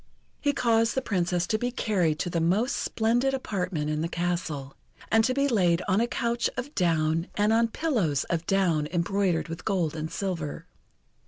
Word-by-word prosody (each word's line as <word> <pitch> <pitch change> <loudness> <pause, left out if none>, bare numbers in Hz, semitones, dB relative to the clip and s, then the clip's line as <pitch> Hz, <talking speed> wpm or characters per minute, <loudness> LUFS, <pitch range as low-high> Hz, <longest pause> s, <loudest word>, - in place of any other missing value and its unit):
He 285 - +2
caused 230 -4 +2
the 265 - +1
Princess 180 -3 0
to 215 +4 0
be 245 - 0
carried 185 -10 0
to 175 - -2
the 170 - 0
most 205 +11 +1
splendid 240 +4 +1
apartment 180 - -2
in 155 0 -1
the 165 - 0
castle, 165 -6 -3 0.4
and 225 0 +5
to 255 - +1
be 280 0 +2
laid 180 -8 +2
on 195 +3 +3
a 235 - +1
couch 235 0 0
of 265 +4 -4
down 165 -2 +1
and 210 +1 +3
on 230 +1 +4
pillows 220 - 0
of 170 -1 -3
down 175 -6 +2
embroidered 180 0 0
with 165 0 -7
gold 175 -6 0
and 155 0 -4
silver. 175 -7 -4
185 Hz, 180 wpm, -27 LUFS, 165-230 Hz, 0.4 s, and